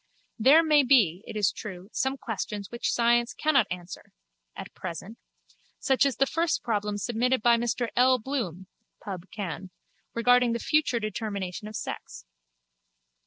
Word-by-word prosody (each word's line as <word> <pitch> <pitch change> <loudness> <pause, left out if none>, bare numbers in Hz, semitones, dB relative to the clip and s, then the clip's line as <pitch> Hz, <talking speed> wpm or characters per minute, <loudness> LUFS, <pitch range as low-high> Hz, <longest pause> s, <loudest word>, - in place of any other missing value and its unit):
There 285 +8 +6
may 305 -2 +5
be, 220 - +3
it - - -6
is 205 -3 +2
true, 185 -3 -8
some 265 +1 -1
questions 210 -4 -5
which 235 0 -1
science 235 0 +2
cannot 275 -8 +2
answer—at 185 +2 -10
present—such 215 - -4
as 270 - -2
the 275 - +4
first 330 +4 -1
problem 210 -3 -1
submitted 240 +3 0
by 235 -1 +6
Mr 240 0 -1
L. 255 +1 +5
Bloom 215 - -4 0.3
(Pubb. 190 -3 -7
Canv.) 190 -2 -6 0.5
regarding 245 0 +4
the 235 - -2
future 305 -4 +1
determination 210 -2 -4
of 215 - -9
sex. - - -6
230 Hz, 135 wpm, -27 LUFS, 200-255 Hz, 0.5 s, There